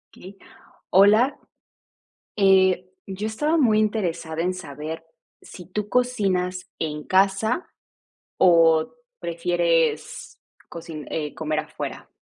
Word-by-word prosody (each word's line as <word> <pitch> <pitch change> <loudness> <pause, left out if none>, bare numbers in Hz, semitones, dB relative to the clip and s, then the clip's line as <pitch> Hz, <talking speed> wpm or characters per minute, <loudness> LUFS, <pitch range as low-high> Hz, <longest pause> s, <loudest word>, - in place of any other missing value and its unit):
Okey. 195 +2 -13 0.5
Hola, 210 +8 +5 1.0
eh, 190 -2 +4 0.2
yo 195 +2 -5
estaba 295 +9 0
muy 225 -8 +3
interesada 175 -7 -2
en 180 +1 -1
saber 160 -1 -7 0.4
si 180 - -12
tú 205 +3 -4
cocinas 195 -7 0
en 150 -2 -3
casa, 195 - +1 0.7
o 165 -3 +4 0.3
prefieres 170 -1 -1 0.3
cocin 165 -3 -8
eh, 150 -2 -3
comer 155 -1 -3
afuera. - - -7
185 Hz, 100 wpm, -23 LUFS, 165-210 Hz, 1.0 s, Hola